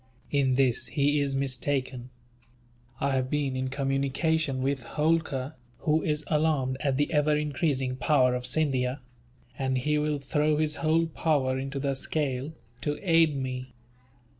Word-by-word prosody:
"In 135 -3 +2
this 130 -3 +1
he 145 +1 +1
is 140 -1 0
mistaken. 130 -2 -2 0.9
I 140 - +1
have 130 -1 0
been 145 -2 -1
in 130 0 -1
communication 135 +1 0
with 135 0 0
Holkar, 150 0 0 0.3
who 155 +1 +2
is 150 -1 -1
alarmed 150 -4 +1
at 140 -3 0
the 145 +3 0
ever 150 0 +3
increasing 140 -3 -1
power 130 -3 +3
of 125 0 -2
Scindia; 130 -2 +1 0.6
and 130 -1 0
he 150 +4 +1
will 150 0 0
throw 150 +2 +1
his 155 0 0
whole 165 +1 +2
power 145 -5 0
into 135 +1 -4
the 140 0 0
scale, 135 0 -2 0.3
to 145 +3 -1
aid 165 -3 +4
me. 130 -1 -5
140 Hz, 145 wpm, -28 LUFS, 130-150 Hz, 0.9 s, aid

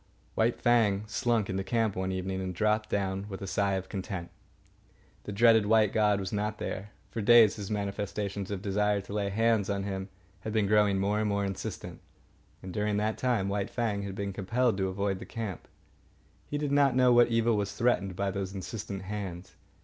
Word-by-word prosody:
White 115 +2 +1
Fang 110 -4 +3
slunk 115 -1 0
into 95 0 -2
camp 115 -1 0
one 95 0 -2
evening 95 0 -3
and 90 -1 -4
dropped 110 +2 +1
down 95 0 -1
with 95 - -6
a - - -3
sigh 100 +1 0
of 95 0 -3
content. 95 -3 -5 0.9
The - - -5
dreaded 110 0 +5
white 110 -1 +4
god 105 -2 +3
was 95 0 -4
not 105 +1 -1
there. 95 +2 -5 0.2
For 115 - -3
days 115 -1 +6
his 100 -2 -6
manifestations 100 -1 -3
of 100 -2 -4
desire 105 +1 +1
to 100 +1 -9
lay 100 -1 -1
hands 110 0 +2
on 100 -1 -1
him 95 -1 -4 0.3
had 110 - -5
been 110 -2 +2
growing 105 -1 +3
more 100 +1 0
insistent, 95 -1 -6 0.6
and 95 -1 -7
during 105 0 0
that 110 +1 -1
time 120 -6 +1
White 100 0 -1
Fang 110 -4 -1
had 100 -1 -5
been 100 0 -3
compelled 115 +5 +1
to 95 -1 0
avoid 95 0 -2
the - - -8
camp. 110 -6 -5 0.8
He 145 - -2
did 145 -1 -2
not 140 -2 +4
know 125 -1 +5
what 120 0 +6
evil 115 -1 +2
was 100 -1 -2
threatened 100 -6 +1
by 100 +1 -1
those 95 0 -4
insistent 100 0 -5
hands. 95 -3 -6
100 Hz, 190 wpm, -29 LUFS, 95-110 Hz, 0.9 s, days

